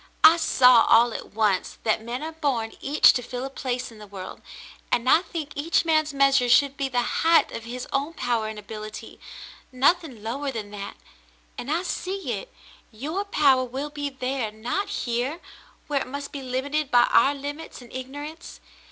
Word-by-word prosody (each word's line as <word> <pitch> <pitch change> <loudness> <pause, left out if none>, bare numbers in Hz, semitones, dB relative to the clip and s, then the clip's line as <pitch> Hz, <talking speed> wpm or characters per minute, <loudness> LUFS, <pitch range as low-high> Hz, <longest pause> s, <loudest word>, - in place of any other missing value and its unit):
I 330 - +9
saw 250 -7 +6
all 235 +1 +6
at - - -8
once 210 -4 +1
that 220 0 +1
men 240 +5 -5
are 320 - -4
born 275 -8 -2
each 290 +3 +5
to 245 - -1
fill 250 +1 -5
a 270 - -6
place 250 -2 -3
in 220 - -14
the 210 - -11
world, 190 -2 -9 0.5
and 240 +1 +1
I 320 - +6
think 330 -5 -6
each 325 +3 +1
man's 310 -2 +2
measure 275 -3 +3
should 280 +3 +4
be 275 -1 -2
the 245 -1 +1 0.2
height 330 0 +4
of 230 - -7
his 250 +2 -6
own 280 +4 -1
power 235 -3 -1
and 215 0 -6
ability, 215 +1 -8 0.5
nothing 270 - +1
lower 275 +6 -3
than 220 -5 -5
that; 200 -1 -7 0.6
and 250 - -7
I 335 +3 0
see 370 -5 -3
it 200 -4 -5 0.3
— - - -32
your 360 +7 -1
power 275 -9 +3
will 265 +4 -5
be 290 -1 -3
there, 260 -4 -3
not 240 - -3
here, 245 +7 -2 0.5
where 285 -3 0
it - - -5
must 280 +2 -6
be 280 - -6
limited 270 +3 -2
by 245 -2 +6
our 280 +1 +5
limits 290 +3 -7
and 245 -2 -14
ignorance. 290 +6 -8
265 Hz, 185 wpm, -25 LUFS, 235-295 Hz, 0.6 s, I